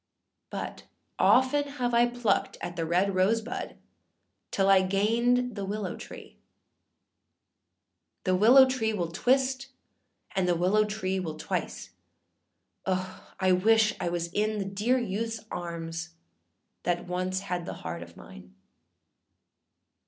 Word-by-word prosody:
But -, -, -6 dB, 0.3 s
often 260 Hz, +3 st, +4 dB
have 245 Hz, -4 st, -1 dB
I 235 Hz, +1 st, +5 dB
plucked 240 Hz, -2 st, 0 dB
at 175 Hz, 0 st, -5 dB
the 165 Hz, -2 st, -2 dB
red 185 Hz, +4 st, +2 dB
rose 190 Hz, +5 st, +3 dB
bud 240 Hz, +2 st, -6 dB, 0.7 s
till 195 Hz, -1 st, +1 dB
I 195 Hz, -1 st, +6 dB
gained 230 Hz, +5 st, +1 dB
the 200 Hz, -, -4 dB
willow 200 Hz, 0 st, -3 dB
tree; -, -, -11 dB, 1.9 s
The 185 Hz, -2 st, +2 dB
willow 245 Hz, +8 st, +8 dB
tree 245 Hz, -4 st, -1 dB
will 175 Hz, -5 st, -2 dB
twist, 260 Hz, +6 st, +1 dB, 0.7 s
and 190 Hz, -2 st, +1 dB
the 175 Hz, -, +3 dB
willow 190 Hz, +5 st, +3 dB
tree 190 Hz, -3 st, -2 dB
will 160 Hz, -4 st, -5 dB
twice,â -, -, -4 dB, 1.0 s
O! 185 Hz, 0 st, -3 dB
I 185 Hz, -1 st, +3 dB
wish 215 Hz, +3 st, +4 dB
I -, -, -1 dB
was 170 Hz, 0 st, -3 dB
in 215 Hz, +1 st, 0 dB
the 200 Hz, -, -2 dB
dear 210 Hz, +6 st, +1 dB
youthâs 225 Hz, 0 st, -3 dB
arms 170 Hz, 0 st, -5 dB, 0.7 s
that 175 Hz, -1 st, -1 dB
once 185 Hz, +1 st, -2 dB
had 180 Hz, -2 st, -4 dB
the -, -, -4 dB
heart 85 Hz, +1 st, -4 dB
of 85 Hz, 0 st, -12 dB
mine. 60 Hz, 0 st, -13 dB
195 Hz, 130 wpm, -28 LUFS, 180-230 Hz, 1.9 s, willow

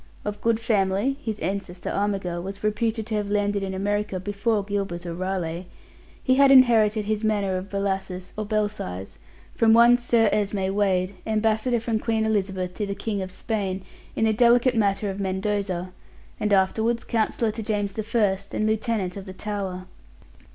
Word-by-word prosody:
Of 210 Hz, 0 st, -4 dB
good 230 Hz, -1 st, +2 dB
family 215 Hz, +4 st, +1 dB
(his 215 Hz, -2 st, -3 dB
ancestor, 190 Hz, -2 st, -3 dB
Armigell, 195 Hz, -4 st, -1 dB
was 195 Hz, +2 st, -7 dB
reputed 220 Hz, +1 st, 0 dB
to 220 Hz, -1 st, -3 dB
have 205 Hz, -1 st, -2 dB
landed 205 Hz, 0 st, +1 dB
in 190 Hz, -1 st, -3 dB
America 205 Hz, 0 st, -1 dB
before 205 Hz, +2 st, 0 dB
Gilbert 195 Hz, -4 st, -3 dB
or 170 Hz, -, -4 dB
Raleigh), 180 Hz, -1 st, -3 dB, 0.6 s
he 260 Hz, -, +3 dB
had 275 Hz, +1 st, +6 dB
inherited 225 Hz, -5 st, +5 dB
his 215 Hz, +1 st, -1 dB
manor 205 Hz, -3 st, +1 dB
of 185 Hz, +2 st, -4 dB
Bellasis, 190 Hz, -2 st, -3 dB
or 215 Hz, -, -2 dB
Belsize, 205 Hz, -, -3 dB, 0.3 s
from 225 Hz, -1 st, +4 dB
one 235 Hz, +1 st, +7 dB
Sir 235 Hz, -2 st, +3 dB
Esme 200 Hz, -2 st, 0 dB
Wade, 190 Hz, -2 st, +1 dB
ambassador 220 Hz, +2 st, +1 dB
from 225 Hz, -1 st, -1 dB
Queen 220 Hz, -1 st, 0 dB
Elizabeth 190 Hz, -4 st, -1 dB
to 210 Hz, +1 st, -3 dB
the 200 Hz, -, -3 dB
King 200 Hz, 0 st, -3 dB
of 185 Hz, -, -4 dB
Spain 190 Hz, -1 st, -3 dB, 0.3 s
in 225 Hz, -, +2 dB
the 220 Hz, -, +3 dB
delicate 240 Hz, +3 st, +4 dB
matter 205 Hz, -2 st, +1 dB
of 195 Hz, -, -7 dB
Mendoza, 190 Hz, -1 st, -2 dB, 0.5 s
and 210 Hz, -, 0 dB
afterwards 220 Hz, +4 st, +2 dB
counsellor 225 Hz, 0 st, 0 dB
to 225 Hz, -, -6 dB
James 205 Hz, -2 st, -1 dB, 0.2 s
I, 205 Hz, -4 st, +3 dB, 0.2 s
and 215 Hz, -, 0 dB
Lieutenant 215 Hz, -4 st, -1 dB
of 195 Hz, 0 st, -8 dB
the 190 Hz, -, -7 dB
Tower. 190 Hz, -2 st, -4 dB
205 Hz, 165 wpm, -25 LUFS, 190-220 Hz, 0.6 s, one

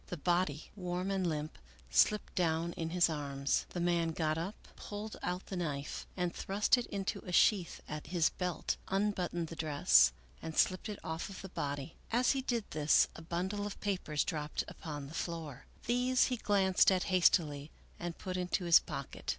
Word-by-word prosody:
The 180 Hz, -, -5 dB
body, 175 Hz, -2 st, 0 dB
warm 180 Hz, 0 st, -2 dB
and 190 Hz, -2 st, 0 dB
limp, 155 Hz, -1 st, -4 dB, 0.3 s
slipped 195 Hz, -, +3 dB
down 170 Hz, -1 st, 0 dB
in 165 Hz, -1 st, -3 dB
his 175 Hz, +1 st, +4 dB
arms. 140 Hz, -3 st, -1 dB
The 175 Hz, -, -5 dB
man 170 Hz, -1 st, +1 dB
got 155 Hz, -1 st, 0 dB
up, 170 Hz, +6 st, -3 dB, 0.2 s
pulled 210 Hz, +1 st, -6 dB
out 180 Hz, +1 st, -3 dB
the 195 Hz, -, -6 dB
knife, 150 Hz, -5 st, -3 dB
and 180 Hz, -1 st, 0 dB
thrust 200 Hz, +5 st, +2 dB
it 245 Hz, -2 st, -3 dB
into 200 Hz, -1 st, -3 dB
a 180 Hz, -, -8 dB
sheath 180 Hz, 0 st, +3 dB
at 150 Hz, -1 st, -6 dB
his 170 Hz, 0 st, +2 dB
belt, 180 Hz, -2 st, -2 dB
unbuttoned 185 Hz, -4 st, -1 dB
the 165 Hz, -, -7 dB
dress, 145 Hz, -, +5 dB, 0.3 s
and 160 Hz, -1 st, -6 dB
slipped 185 Hz, +4 st, +2 dB
it 210 Hz, -, -4 dB
off 160 Hz, +3 st, -4 dB
of 195 Hz, -, -9 dB
the 190 Hz, -, -7 dB
body. 145 Hz, -2 st, -4 dB
As 245 Hz, +2 st, +3 dB
he 270 Hz, -, 0 dB
did 240 Hz, -3 st, -1 dB
this 150 Hz, 0 st, +4 dB
a -, -, -9 dB
bundle 190 Hz, +5 st, -2 dB
of 205 Hz, -, -8 dB
papers 180 Hz, -7 st, -1 dB
dropped 150 Hz, -1 st, -2 dB
upon 145 Hz, -3 st, -7 dB
the 140 Hz, -, -10 dB
floor; 160 Hz, -6 st, -5 dB, 0.2 s
these 250 Hz, +2 st, +3 dB
he -, -, -1 dB
glanced 195 Hz, -3 st, +4 dB
at 185 Hz, -1 st, +2 dB
hastily 155 Hz, -5 st, +3 dB, 0.3 s
and 175 Hz, -1 st, -4 dB
put 185 Hz, -1 st, -4 dB
into 180 Hz, 0 st, -1 dB
his 170 Hz, -1 st, +8 dB
pocket. -, -, -7 dB
175 Hz, 185 wpm, -33 LUFS, 155-195 Hz, 0.3 s, his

